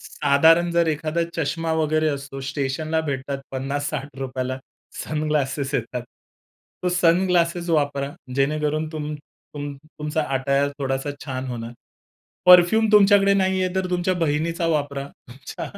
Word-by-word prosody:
साधारण 160 +4 +3
जर 170 0 +3
एखादा 155 +2 -1
चष्मा 165 +1 -1
वगैरे 155 0 +1
असतो, 140 -1 -5
स्टेशनला 145 +3 -2
भेटतात 140 -1 -3
₹50-60 135 -1 -3 0.5
सनग्लासेस 150 -2 -1
येतात. 125 0 -2 0.8
तो 180 - +1
सनग्लासेस 175 0 +2
वापरा. 145 -3 0 0.3
जेणेकरून 150 +2 0
तुम 150 -1 -4 0.4
तुम 145 0 -5
तुमचा 155 +2 -4
अटायर 140 +2 +1
थोडासा 135 +1 -2
छान 130 -2 -4
होणार. 120 -2 -5 0.7
परफ्यूम 180 +5 +7
तुमच्याकडे 200 -1 +6
नाहीये 190 -1 +1
तर 190 -1 0
तुमच्या 180 +1 +1
बहिणीचा 165 +2 0
वापरा. 145 -3 -1 0.2
अच्छा 130 +2 -8
150 Hz, 115 wpm, -23 LUFS, 140-170 Hz, 0.8 s, परफ्यूम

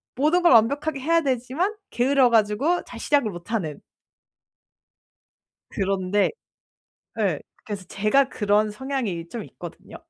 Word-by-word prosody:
모든 305 +7 +2
걸 350 - +5
완벽하게 275 +6 +3
해야 330 +5 +2
되지만 275 - -1 0.2
게을러 260 +1 +3
가지고 230 +10 +2
잘 235 - -10
시작을 285 -3 +2
못하는. 175 -4 -4 1.9
그런데 195 +1 0 0.9
예 - - 0 0.2
그래서 205 -3 -6
제가 215 +7 +2
그런 210 0 +1
성향이 210 -8 -4
좀 225 0 -6
있거든요. 175 -2 -11
235 Hz, 260 characters per minute, -24 LUFS, 205-280 Hz, 1.9 s, 걸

